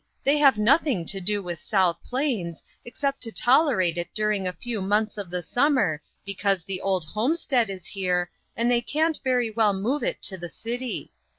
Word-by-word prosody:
They 285 Hz, +2 st, +3 dB
have 275 Hz, -6 st, +6 dB
nothing 240 Hz, -, +3 dB
to 195 Hz, +2 st, -3 dB
do 205 Hz, +2 st, 0 dB
with 175 Hz, -2 st, -5 dB
South 185 Hz, -5 st, +2 dB
Plains, 245 Hz, -, -2 dB, 0.2 s
except 275 Hz, +3 st, -3 dB
to 230 Hz, -, -1 dB
tolerate 240 Hz, -, +3 dB
it 175 Hz, 0 st, -4 dB
during 210 Hz, -3 st, 0 dB
a -, -, -1 dB
few 230 Hz, 0 st, -4 dB
months 210 Hz, +3 st, +1 dB
of 205 Hz, -4 st, -5 dB
the 180 Hz, 0 st, -3 dB
summer 245 Hz, -, +2 dB, 0.2 s
because 195 Hz, -2 st, 0 dB
the 185 Hz, +1 st, -4 dB
old 190 Hz, -4 st, +1 dB
homestead 240 Hz, -, 0 dB
is 185 Hz, -3 st, -7 dB
here, 180 Hz, -2 st, -1 dB, 0.3 s
and 235 Hz, +1 st, +2 dB
they 240 Hz, -1 st, +3 dB
can't 315 Hz, +5 st, 0 dB
very 250 Hz, -4 st, +1 dB
well 215 Hz, -2 st, +3 dB
move 230 Hz, +10 st, -1 dB
it -, -, -2 dB
to 190 Hz, -2 st, -1 dB
the 175 Hz, 0 st, -6 dB
city. 240 Hz, +5 st, -5 dB
210 Hz, 185 wpm, -25 LUFS, 185-255 Hz, 0.3 s, have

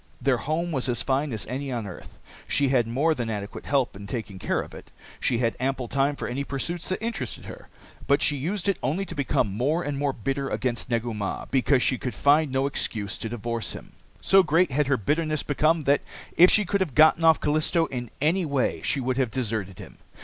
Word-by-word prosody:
Their -, -, +2 dB
home 165 Hz, +4 st, -2 dB
was 135 Hz, -4 st, -1 dB
as 120 Hz, -, 0 dB
fine 135 Hz, +2 st, 0 dB
as 110 Hz, -4 st, -2 dB
any 135 Hz, +3 st, -4 dB
on 120 Hz, -3 st, -3 dB
earth. 95 Hz, -, -10 dB, 0.3 s
She 140 Hz, -2 st, +2 dB
had 125 Hz, -4 st, +2 dB
more 140 Hz, +8 st, +2 dB
than 120 Hz, -6 st, -3 dB
adequate 100 Hz, -2 st, -5 dB
help 135 Hz, -7 st, +1 dB
in 100 Hz, +1 st, -9 dB
taking 105 Hz, -4 st, -5 dB
care -, -, 0 dB
of -, -, -10 dB
it. -, -, -11 dB, 0.3 s
She 120 Hz, -, +1 dB
had 115 Hz, -1 st, 0 dB
ample 130 Hz, -1 st, -1 dB
time 140 Hz, +3 st, +1 dB
for -, -, -5 dB
any 135 Hz, +3 st, -2 dB
pursuits 170 Hz, +5 st, -3 dB
that 185 Hz, +3 st, -2 dB
interested 140 Hz, -, -4 dB
her. -, -, -10 dB, 0.4 s
But 140 Hz, +1 st, +4 dB
she 145 Hz, -, +4 dB
used 175 Hz, +8 st, -2 dB
it 200 Hz, -, +1 dB
only 160 Hz, +10 st, -1 dB
to 170 Hz, -, -7 dB
become 135 Hz, -9 st, 0 dB
more 150 Hz, +9 st, 0 dB
and 145 Hz, -1 st, -3 dB
more 145 Hz, -1 st, +1 dB
bitter 135 Hz, +3 st, -3 dB
against 125 Hz, -1 st, -2 dB
Negu 115 Hz, -1 st, -1 dB
Mah 105 Hz, -2 st, -4 dB
because 135 Hz, -1 st, +3 dB
she 130 Hz, -, +1 dB
could 125 Hz, -5 st, -4 dB
find 145 Hz, +6 st, +3 dB
no 135 Hz, +1 st, +1 dB
excuse 105 Hz, -7 st, -2 dB
to 115 Hz, -, -4 dB
divorce 115 Hz, 0 st, -3 dB
him. -, -, -10 dB, 0.3 s
So 195 Hz, 0 st, +6 dB
great 165 Hz, -1 st, +2 dB
had 145 Hz, +2 st, +1 dB
her 135 Hz, -1 st, +2 dB
bitterness 155 Hz, -, 0 dB
become 155 Hz, +2 st, +1 dB
that, 140 Hz, 0 st, +3 dB, 0.3 s
if 180 Hz, +2 st, +8 dB
she 210 Hz, -, +4 dB
could 200 Hz, +2 st, 0 dB
have 160 Hz, -9 st, -1 dB
gotten 155 Hz, +1 st, +6 dB
off 160 Hz, -2 st, +6 dB
Callisto 155 Hz, +3 st, +1 dB
in 120 Hz, -5 st, -5 dB
any 170 Hz, +6 st, +2 dB
way, 140 Hz, -5 st, 0 dB
she 145 Hz, -, 0 dB
would 130 Hz, 0 st, -1 dB
have 130 Hz, -3 st, +1 dB
deserted 110 Hz, -6 st, -3 dB
him. -, -, -12 dB
135 Hz, 220 wpm, -25 LUFS, 120-155 Hz, 0.4 s, if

